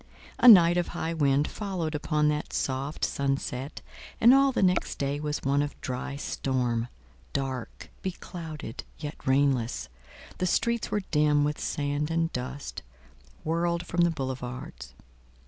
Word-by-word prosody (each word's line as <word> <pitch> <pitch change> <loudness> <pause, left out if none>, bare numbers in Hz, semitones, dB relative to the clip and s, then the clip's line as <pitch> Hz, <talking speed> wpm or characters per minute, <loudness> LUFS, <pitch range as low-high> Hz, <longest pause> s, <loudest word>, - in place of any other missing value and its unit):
A - - +6
night 175 -6 +9
of 175 - +1
high 165 +1 -3
wind 145 -2 +2
followed 185 -6 -3
upon 150 0 +1
that 150 0 -2
soft 135 +3 -1
sunset, 135 0 -2 0.4
and 235 +3 +8
all 275 0 +5
the 245 - +1
next 180 -1 +2
day 140 +1 -1
was 150 0 -3
one 140 +1 +2
of 145 0 -4
dry 130 +2 -4
storm—dark, 125 - -3
beclouded, 165 - -6
yet 150 -1 -5
rainless,—the 125 - -1
streets 235 +5 +1
were 210 - -1
dim 150 -1 +4
with 150 0 -1
sand 145 +1 -1
and 165 0 0
dust, 130 +3 -5 0.6
whirled 170 +2 0
from 175 - 0
the 170 - +5
boulevards. 125 - -5
145 Hz, 130 wpm, -28 LUFS, 130-170 Hz, 0.6 s, night